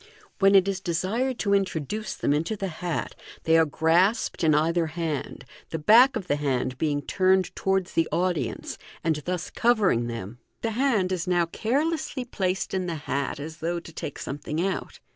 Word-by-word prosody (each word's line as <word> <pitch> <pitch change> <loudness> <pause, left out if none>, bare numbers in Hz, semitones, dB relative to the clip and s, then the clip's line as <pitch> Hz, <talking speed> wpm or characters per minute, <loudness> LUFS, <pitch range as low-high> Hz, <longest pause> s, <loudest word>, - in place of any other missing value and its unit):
When 195 0 +5
it 190 0 +6
is 195 -1 -1
desired 210 +9 -1
to 200 -3 +1
introduce 195 +2 -1
them 145 - +1
into 165 +9 -1
the 195 -2 -3
hat, 175 0 -3 0.3
they 160 - +3
are 160 -1 +5
grasped 170 - +2
in 155 -2 +4
either 165 +2 +2
hand, 160 -5 -4 0.2
the 160 - -3
back 230 - +6
of 190 - -3
the 145 - 0
hand 130 -3 -1
being 145 -2 0
turned 185 -1 +2
towards 190 -1 0
the 165 - +1
audience, 180 -2 -1 0.2
and 160 -2 +1
thus 180 +3 -4
covering 205 - +2
them. 115 0 -6 0.2
The 225 - 0
hand 225 -6 +1
is 180 -1 -2
now 175 -1 +3
carelessly 285 - -1
placed 190 -5 -2
in 185 -1 -1
the 170 - -2
hat, 140 +1 -2
as 155 +2 -7
though 170 +2 -2
to 165 -1 -13
take 145 - -6
some 140 - -5
thing 150 +2 -4
out. 195 - -4
175 Hz, 180 wpm, -26 LUFS, 155-195 Hz, 0.3 s, it